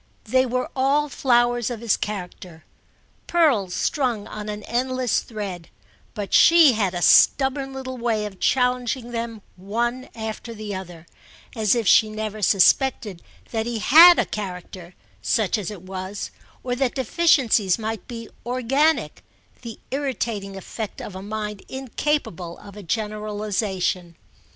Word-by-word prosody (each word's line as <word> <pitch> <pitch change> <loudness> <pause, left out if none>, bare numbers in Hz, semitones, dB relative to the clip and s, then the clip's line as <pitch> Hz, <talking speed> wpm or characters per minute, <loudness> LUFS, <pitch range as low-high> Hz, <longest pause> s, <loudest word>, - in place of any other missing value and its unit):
They 260 0 +2
were 250 +1 -1
all 280 +3 +2
flowers 240 -2 +2
of 240 -3 -5
his 230 -2 +1
character, 180 -5 -7 0.6
pearls 260 - +2
strung 245 -8 -1
on 215 -1 -7
an 210 0 -5
endless 255 +1 0
thread; 195 -6 -7 0.5
but 205 -3 -5
she 330 -4 +7
had 200 -5 -1
a 175 - -2
stubborn 270 0 +4
little 260 -1 -6
way 225 -3 0
of 195 -3 -8
challenging 250 -1 0
them 230 -3 -5
one 240 +7 -3
after 220 +1 -6
the 210 -1 -6
other, 175 -3 -8 0.5
as 220 -1 +2
if 230 -4 -1
she 215 +4 +6
never 215 0 -5
suspected 205 -1 +2 0.3
that 225 0 -2
he 240 -1 -2
had 330 +10 +8
a - - +2
character, 180 -3 -7 0.3
such 210 - +1
as 210 -5 -3
it 200 -4 -9
was, 190 +1 -6 0.3
or 245 -1 -2
that 260 -1 -1
deficiencies 260 - +2
might 220 -2 -5
be 230 -2 -7 0.2
organic; 255 +6 0 0.4
the 230 -3 -8
irritating 235 -8 -3
effect 210 +2 -6
of 205 - -7
a 190 - -6
mind 210 0 -5
incapable 260 - -3
of 200 -1 -13
a 210 - -9
generalisation. 205 -3 -2
220 Hz, 140 wpm, -23 LUFS, 200-255 Hz, 0.6 s, had